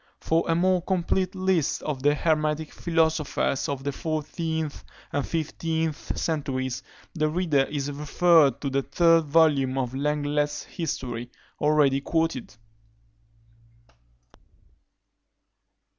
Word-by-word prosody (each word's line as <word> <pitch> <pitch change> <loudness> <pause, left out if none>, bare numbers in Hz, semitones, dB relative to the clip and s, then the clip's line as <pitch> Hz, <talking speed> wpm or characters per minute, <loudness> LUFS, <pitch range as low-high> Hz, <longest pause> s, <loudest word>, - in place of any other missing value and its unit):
For 165 +1 +1
a 165 - +3
more 180 +1 +2
complete 185 +1 0
list 185 -5 0
of 145 -4 -3
the 145 +2 +3
hermetic 155 -1 0
philosophers 160 -5 0
of 140 -1 -3
the 140 - -1
fourteenth 160 0 -3 0.3
and 145 - -1
fifteenth 160 -1 -2
centuries, 130 -5 -2 0.3
the 155 -2 0
reader 155 -5 +2
is 145 -1 -3
referred 150 -1 +3
to 140 - -2
the 140 +1 +1
third 165 +4 +3
volume 145 -4 +3
of 125 -2 -1
Lenglet's 145 +1 -1
History, 125 -8 -4 0.3
already 150 -2 +3
quoted. 160 -7 -1
150 Hz, 105 wpm, -26 LUFS, 140-165 Hz, 0.3 s, a